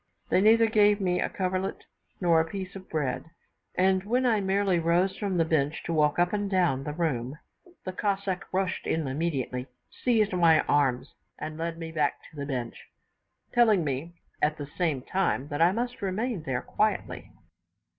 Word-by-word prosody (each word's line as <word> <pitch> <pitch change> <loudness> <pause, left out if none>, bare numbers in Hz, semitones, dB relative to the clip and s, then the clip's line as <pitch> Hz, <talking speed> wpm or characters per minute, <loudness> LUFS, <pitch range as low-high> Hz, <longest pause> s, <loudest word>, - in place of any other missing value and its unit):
They 185 - +3
neither 225 +2 +6
gave 210 -2 +4
me 180 -2 0
a - - 0
coverlet 185 0 -2 0.4
nor 170 -3 +4
a 165 - -4
piece 190 +1 -6
of 190 -1 -10
bread; 145 -5 -2 0.5
and 190 0 +3
when 245 +5 +1
I 225 -4 +3
merely 195 -2 +1
rose 175 +3 +2
from 195 -4 -2
the 165 - +3
bench 155 -2 0
to 170 - -3
walk 150 -2 +2
up 175 +2 +2
and 205 -1 -1
down 175 -8 +1
the 150 - -3
room, 145 -5 -2 0.5
the 185 - -4
Cossack 195 -1 -2
rushed 190 0 -1
in 160 -1 0
immediately, 135 -3 -2 0.2
seized 220 -5 +1
my 170 -3 +5
arms, 135 -4 +1 0.2
and 155 +1 -6
led 165 +1 -3
me 165 -1 -6
back 150 -3 0
to - - -18
the 140 -1 -5
bench, 125 -4 -5 0.7
telling 220 -7 +4
me, 150 +4 -3 0.3
at 150 +1 +2
the 145 - -5
same 145 -3 -2
time, 175 -7 -1
that 145 +1 -2
I 170 +2 +6
must 240 +4 -3
remain 205 +2 -2
there 125 -1 -1
quietly. 215 0 -1
175 Hz, 175 wpm, -27 LUFS, 150-195 Hz, 0.7 s, neither